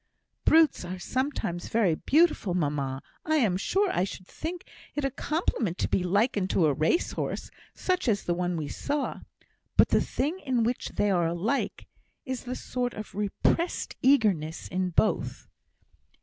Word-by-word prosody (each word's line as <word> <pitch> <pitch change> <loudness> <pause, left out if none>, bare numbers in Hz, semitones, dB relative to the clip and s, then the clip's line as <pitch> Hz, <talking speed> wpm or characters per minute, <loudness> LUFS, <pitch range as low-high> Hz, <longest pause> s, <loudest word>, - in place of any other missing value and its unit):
"Brutes 320 - +5
are 180 +1 -5
sometimes 250 -5 -2
very 215 -7 +2
beautiful, 290 - +2
mamma. 140 -5 -1 0.2
I 315 - +1
am 225 -11 +3
sure 385 - +1
I 180 - +1
should 185 -1 -6
think 340 - -6 0.3
it 295 -2 -1
a 275 - 0
compliment 250 - -1
to - - 0
be - - +1
likened 200 +1 +1
to 170 - +3
a 150 - +3
race 155 - +1
horse, - - -4 0.2
such 365 -5 0
as 205 -4 +2
the 175 - 0
one 175 0 -1
we 155 -2 -3
saw. 285 - -2 0.6
But - - +6
the - - +4
thing 310 +8 -2
in 255 -8 0
which 240 +2 -1
they 205 - +2
are 175 -3 +2
alike, 185 +11 -1 0.4
is 260 -2 -4
the 250 +1 -3
sort 245 -1 -3
of 215 0 -7
repressed 210 - 0
eagerness 205 - +2
in 185 0 0
both." 210 +5 0
215 Hz, 165 wpm, -28 LUFS, 175-280 Hz, 0.6 s, But